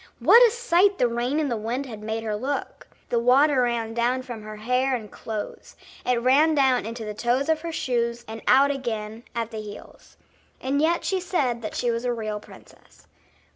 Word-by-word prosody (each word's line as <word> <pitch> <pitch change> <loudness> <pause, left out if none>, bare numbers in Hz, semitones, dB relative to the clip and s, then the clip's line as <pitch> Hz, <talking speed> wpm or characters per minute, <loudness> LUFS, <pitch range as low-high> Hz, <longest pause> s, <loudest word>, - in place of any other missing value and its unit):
what 470 - +7
a - - +1
sight 405 -4 +2
the 245 - +3
rain 240 +5 -1
and 295 -4 -1
the - - +1
wind 235 +5 -3
had 220 -5 -9
made 220 +1 -3
her 215 -1 -2
look. 270 +7 -4 0.2
The 235 - +1
water 260 +3 +4
ran 235 -2 -1
down 245 +2 0
from 240 -4 -7
her 215 0 -8
hair 250 +5 0
and 215 -4 -7
clothes; 215 -2 -7 0.3
it 250 -1 +1
ran 285 +6 +4
down 265 -5 +2
into 230 0 -6
the 210 - -4
toes 245 +7 0
of 315 -1 +2
her 335 0 -4
shoes 235 -5 -1
and 220 0 -7
out 275 +2 +5
again 225 -4 -5
at 230 -1 -2
the 220 -1 -5
heels. 210 -1 -12 0.4
And 275 +2 0
yet 335 +2 +1
she 380 - 0
said 275 -10 -1
that 215 - -6
she 240 - 0
was 230 +1 -3
a 245 -1 0
real 215 -2 -4
princess. - - -18
245 Hz, 205 wpm, -25 LUFS, 225-275 Hz, 0.4 s, what